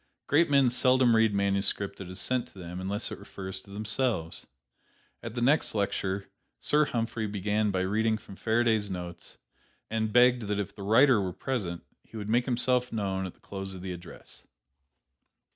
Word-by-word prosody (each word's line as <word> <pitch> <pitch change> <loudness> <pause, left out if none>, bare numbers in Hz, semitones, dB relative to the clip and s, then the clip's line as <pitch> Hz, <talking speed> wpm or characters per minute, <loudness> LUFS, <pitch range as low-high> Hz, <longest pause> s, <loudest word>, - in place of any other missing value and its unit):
Great 160 +3 +3
men 140 -3 +4
seldom 125 -1 +4
read 110 -1 +4
manuscript 100 0 +1
that 95 -2 -7
is 95 +1 -6
sent 125 +4 0
to - - -20
them 90 0 -7
unless 100 +3 -2
it - - -6
refers 95 -1 -7
to - - -18
themselves. 105 -4 -1 0.7
At 115 0 -7
the 120 - -2
next 145 -1 +3
lecture, 100 -1 -1 0.3
Sir 150 +1 +3
Humphry 115 -3 -2
began 105 +1 0
by 95 -2 0
reading 110 +4 +1
from 100 - -12
Faraday's 110 -1 +1
notes, 90 -2 -7 0.5
and 110 -1 0
begged 125 -1 +4
that 105 0 -1
if 100 - -3
the 100 - -11
writer 115 +3 +5
were 95 -2 -3
present, 95 -10 -3 0.2
he 115 - -12
would 105 -1 -5
make 120 +2 +3
himself 125 0 +1
known 95 -3 -2
at 90 - -10
the - - -29
close 95 -1 -6
of 90 - -9
the 95 -1 -4
address. 85 0 -11
105 Hz, 175 wpm, -29 LUFS, 95-120 Hz, 0.7 s, writer